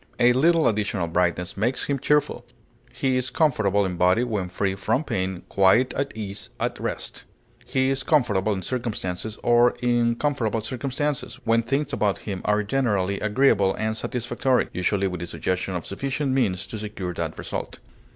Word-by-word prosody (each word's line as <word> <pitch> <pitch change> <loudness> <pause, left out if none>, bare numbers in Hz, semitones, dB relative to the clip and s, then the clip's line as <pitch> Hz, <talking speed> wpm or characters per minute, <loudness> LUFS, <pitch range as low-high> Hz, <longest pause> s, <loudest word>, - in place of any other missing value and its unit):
A 120 0 +6
little 160 +4 +4
additional 105 -4 0
brightness 90 +1 0
makes 115 +6 0
him 140 -1 -1
cheerful. 150 +2 +1 0.5
He 130 -1 0
is 130 0 -1
comfortable 110 - +2
in 90 -2 -3
body 90 +7 +4
when 105 -7 -2
free 95 +2 -1
from 110 +8 0
pain, 95 - -2
quiet, 100 +6 +4
at 140 0 -2
ease, 100 -2 -6
at - - -2
rest. - - -5 0.4
He 130 0 +1
is 135 0 -1
comfortable 110 -10 +2
in 95 -2 -2
circumstances, 110 -4 -3
or 120 0 +4
in 120 -1 +2
comfortable 120 -5 0
circumstances, 135 +4 -3
when 115 0 +3
things 135 +5 -1
about 105 -2 +1
him 95 -3 -4
are 105 0 +2
generally 100 -5 0
agreeable 105 -3 +3
and 110 0 -1
satisfactory, 125 +2 0
usually 95 +2 0
with 90 -2 -4
the 85 - -5
suggestion 90 +2 -2
of 85 - -4
sufficient 135 +6 -2
means 105 -8 +1
to 110 - -6
secure 100 -4 -5
that - - -4
result. - - -5
110 Hz, 165 wpm, -24 LUFS, 95-130 Hz, 0.5 s, A